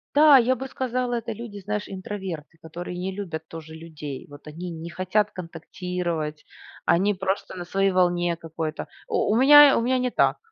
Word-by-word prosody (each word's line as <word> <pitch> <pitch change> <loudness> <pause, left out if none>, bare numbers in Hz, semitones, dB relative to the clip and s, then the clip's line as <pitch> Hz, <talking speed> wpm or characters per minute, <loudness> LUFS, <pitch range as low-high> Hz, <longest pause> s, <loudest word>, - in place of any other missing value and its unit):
Да, 300 -1 +8
я 255 +1 +4
бы 265 - -6
сказала, 250 -1 -2
это 230 0 -3
люди, 215 -1 -8
знаешь, 210 +1 -3
интроверты, 185 -5 -6
которые 175 +2 -7
не 190 +1 -3
любят 160 -6 -6
тоже 160 -1 -9
людей. 155 -4 -8
Вот 145 +1 -14
они 170 +4 -7
не 165 +1 -7
хотят 185 +4 0
контактировать, 170 -2 -5 0.4
они 195 +5 +3
просто 190 +1 -3
на 180 - -6
своей 195 +2 +1
волне 175 -1 +2
какой-то. 160 -1 -5 0.2
У - - +1
у - - +3
меня, 290 +2 +8
у - - +1
меня 255 +2 +1
не 250 0 0
так. - - +2
185 Hz, 175 wpm, -25 LUFS, 165-215 Hz, 0.4 s, Да